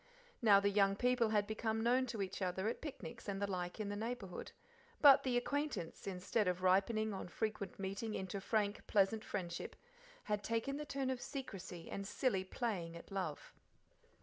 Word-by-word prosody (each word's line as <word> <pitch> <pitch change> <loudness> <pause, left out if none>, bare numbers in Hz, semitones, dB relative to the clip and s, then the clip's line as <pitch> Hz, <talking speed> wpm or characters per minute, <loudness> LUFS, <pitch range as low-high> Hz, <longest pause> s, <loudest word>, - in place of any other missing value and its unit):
Now 205 -4 +7
the 200 0 +2
young 195 -1 +4
people 245 0 +3
had 210 -1 +3
become 220 +1 -1
known 255 +2 +3
to 225 -4 -2
each 190 +1 -5
other 190 +2 0
at 230 - -2
picnics 240 -7 -7
and 195 -1 -2
the 200 - +1
like 180 -1 -3
in 210 -2 -2
the 205 - -2
neighbourhood, 220 -4 -4 0.5
but 280 -3 +9
the 250 -2 +1
acquaintance, 265 - -2
instead 190 +2 0
of 180 0 0
ripening 210 +4 +3
on 190 - -5
frequent 215 +1 -3
meeting 200 +3 -3
into 190 +1 -3
a - - -5
frank, 210 0 0
pleasant 210 +1 +3
friendship, 175 -4 -4 0.5
had 210 -1 -1
taken 230 +5 -1
the 300 - -4
turn 270 -2 -1
of 255 -1 -3
secrecy 195 - -6
and 195 0 -4
silly 205 -5 +1
playing 185 -5 -3
at 170 - -11
love. 185 -7 -3
205 Hz, 180 wpm, -37 LUFS, 190-235 Hz, 0.5 s, but